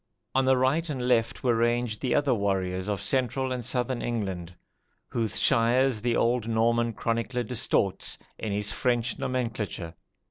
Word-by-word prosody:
On 135 0 +3
the 130 0 +4
right 145 +6 +1
and 130 -4 -2
left 115 -2 +1
were 125 -2 +3
ranged 120 -1 0
the 125 - +1
other 145 -3 +3
warriors 95 -3 -1
of 100 -1 -2
central 130 +4 0
and 125 -1 -2
southern 125 +1 -1
England, 95 -7 -3 0.5
whose 115 -3 -1
shires 120 0 +3
the 120 0 +1
old 120 -1 +1
Norman 115 +1 +2
chronicler 115 +3 -1
distorts 105 -4 0 0.2
in 110 - -3
his 105 +1 0
French 120 -2 0
nomenclature. 110 -9 -3
120 Hz, 150 wpm, -27 LUFS, 105-125 Hz, 0.5 s, the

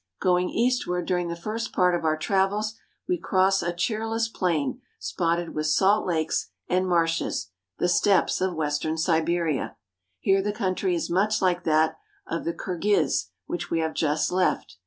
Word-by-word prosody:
Going 180 0 +2
eastward 230 -8 0
during 180 -2 0
the 170 - -3
first 215 +6 -4
part 180 -1 +3
of 170 -1 -1
our 155 -1 +1
travels, 200 +5 0 0.3
we 360 -1 0
cross 195 -3 +2
a 175 0 -1
cheerless 225 +5 -1
plain 170 -10 -1 0.2
spotted 165 - -1
with 155 0 -1
salt 190 +7 +3
lakes 160 -3 0 0.2
and 185 +1 +1
marshes, 165 - 0 0.3
the - - +1
Steppes 190 +1 +3
of 185 -1 0
western 155 +1 -1
Siberia. 165 -2 0 0.4
Here 195 - +3
the 205 +1 -2
country 185 -2 0
is 170 - -3
much 205 +4 +2
like 180 -2 +1
that 160 0 +2 0.3
of 165 - -4
the 170 - -1
Kirghiz 190 - 0 0.2
which 175 - -4
we 165 - 0
have 160 0 -1
just 155 0 0
left. 180 - 0
175 Hz, 160 wpm, -26 LUFS, 160-195 Hz, 0.4 s, part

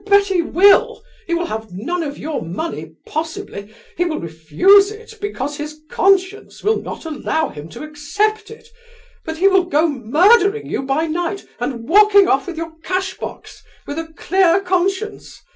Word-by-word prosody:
"I 405 - -15
bet 400 0 +6
he 380 -3 +1
will! 380 +4 +4 0.2
He 340 - 0
will 345 +1 -1
have 220 - -6
none 335 - -3
of 290 -3 -5
your 305 -1 -4
money, 190 - -5
possibly, 320 - -5 0.2
he 355 - +1
will 335 -3 -2
refuse 350 - +4
it 445 +1 -11
because 290 -8 -4
his 300 +1 -7
conscience 390 +1 +1
will 435 +2 +1
not - - -8
allow 315 +1 -2
him 150 +2 -10
to 165 - -9
accept 410 +9 -2
it, 450 +1 -13 0.6
but 320 0 -5
he 380 +4 +4
will 380 -2 +4
go 330 -1 +2
murdering 360 - +3
you - - -3
by 275 +4 0
night 345 +4 -3
and 235 -4 -4
walking 405 +2 +6
off 270 -6 +1
with 350 -3 -6
your 330 0 -5
cashbox, 370 +2 -5 0.2
with 290 +3 -5
a 325 0 -7
clear 370 0 +3
conscience! 380 +3 -2
340 Hz, 170 wpm, -19 LUFS, 295-395 Hz, 0.6 s, bet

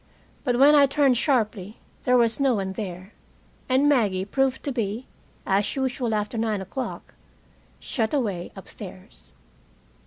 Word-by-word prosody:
But 245 -3 +1
when 280 +3 +7
I 285 -2 +6
turned 275 -2 +3
sharply 220 -6 0 0.3
there 250 0 +4
was 230 0 +2
no 270 -3 +3
one 190 -2 -2
there, 190 0 -7 0.6
and 265 +3 +3
Maggie 205 -10 +2
proved 265 +4 0
to 285 - -2
be, 230 0 -3 0.4
as 195 +1 +1
usual 255 -4 -1
after 210 +2 -2
nine 220 -2 0
o'clock, 205 +7 -6 0.7
shut 225 -3 -2
away 205 - -2
upstairs. - - -12
235 Hz, 135 wpm, -25 LUFS, 205-265 Hz, 0.7 s, when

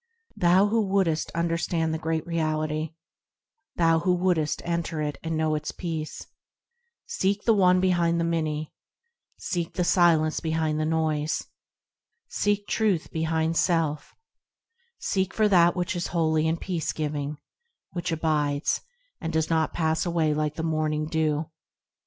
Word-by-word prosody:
Thou 185 0 +4
who 225 +1 +2
wouldst 190 -6 +1
understand 165 -1 0
the 160 - -2
Great 160 0 -2
Reality; 155 -1 -1 0.8
Thou 165 -1 +3
who 180 +2 +2
would'st 175 -4 0
enter 170 -2 -2
it, 150 -1 -3
and 165 -1 -2
know 155 0 +1
its 150 0 -2
peace; 160 -3 -5 0.8
Seek 200 +2 -1
the 230 - +4
One 185 -3 +4
behind 175 -2 +2
the - - +1
many, 155 -2 -2 0.6
Seek 170 -3 -3
the 180 - +1
Silence 165 -3 +3
behind 160 -1 -1
the 155 - 0
noise, 155 -1 0 0.8
Seek 205 - 0
Truth 205 -8 0
behind 160 0 0
self; 165 -4 0 0.8
Seek 190 -1 -1
for 215 -1 +4
that 175 -3 +5
which 180 0 -1
is 175 - -2
holy 160 -2 +1
and 165 +1 0
peace 175 -5 -2
giving, 150 -1 -3 0.6
Which 175 -1 -3
abides, 150 -2 0 0.4
and 165 -2 -3
does 160 0 0
not 160 -1 +2
pass 160 -1 0
away 165 -3 +1
like 150 0 -1
the 160 - -4
morning 155 -1 0
dew. 155 -1 -1
160 Hz, 140 wpm, -26 LUFS, 155-175 Hz, 0.8 s, that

